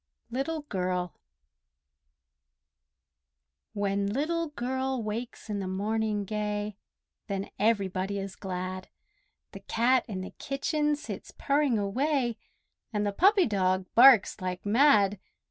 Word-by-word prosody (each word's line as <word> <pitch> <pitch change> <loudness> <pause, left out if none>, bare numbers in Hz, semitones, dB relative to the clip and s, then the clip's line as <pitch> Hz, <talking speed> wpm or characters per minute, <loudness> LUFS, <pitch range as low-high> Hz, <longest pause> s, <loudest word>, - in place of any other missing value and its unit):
LITTLE 295 +5 -2
GIRL 180 - -2 2.6
When 200 -1 0
Little 320 +9 -1
Girl 260 -2 -2
wakes 225 +3 -5
in 210 -2 -2
the 190 - -3
morning 210 +2 -1
gay 210 0 -3 0.5
Then 195 -1 -4
everybody 200 -2 +1
is 195 -1 -5
glad; 185 -1 -5 0.6
The - - -9
cat 245 +2 +2
in 190 -4 -4
the 185 - -7
kitchen 295 +2 0
sits 295 - -8
purring 280 -4 +2
away, 240 +4 0 0.5
And 210 -2 -1
the 205 - 0
puppy 390 - +5
dog 185 -3 +1
barks 240 -5 +7
like 180 0 -4
mad. 210 -4 +4
210 Hz, 110 wpm, -28 LUFS, 195-265 Hz, 2.6 s, barks